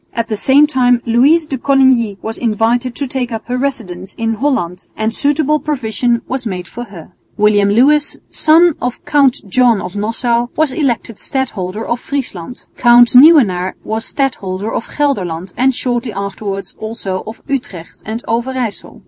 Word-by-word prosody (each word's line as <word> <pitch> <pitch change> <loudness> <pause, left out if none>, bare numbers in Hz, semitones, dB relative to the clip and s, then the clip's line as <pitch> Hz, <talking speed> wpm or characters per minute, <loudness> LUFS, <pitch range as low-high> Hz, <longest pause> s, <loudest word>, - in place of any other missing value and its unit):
At 230 0 -2
the 215 - -1
same 270 +7 +4
time 250 -4 +2
Louise 275 +8 +3
de 270 -4 -4
Coligny 260 -6 +3
was 220 0 -4
invited 235 +2 0
to 285 - -3
take 255 -2 -3
up 225 -1 -5
her 250 - -3
residence 210 -9 -4
in 225 -1 -1
Holland 220 -8 -2
and 220 +1 -1
suitable 295 +2 +1
provision 240 -5 -1
was 260 -2 -3
made 180 -3 -5
for 240 +5 -7
her. 190 -7 -12 0.3
William 205 -1 +3
Lewis, 290 +8 +3
son 325 +2 +4
of 250 0 -4
Count 280 -4 +3
John 240 +1 +3
of 180 - -7
Nassau, 235 +3 0
was 310 -3 +1
elected 240 -6 -2
Stadholder 220 -6 -3
of 235 - -2
Friesland. 250 -7 -5
Count 240 0 +6
Nieuwenaar 250 - +5
was 220 +1 -3
Stadholder 210 -7 -3
of - - -3
Gelderland 185 - -2
and 260 +2 +3
shortly 240 -3 -2
afterwards 200 -1 -5
also 215 -4 -4
of 220 - -9
Utrecht 235 - -5
and 225 +3 -5
Overyssel. 240 -1 -3
235 Hz, 155 wpm, -15 LUFS, 210-265 Hz, 0.3 s, Count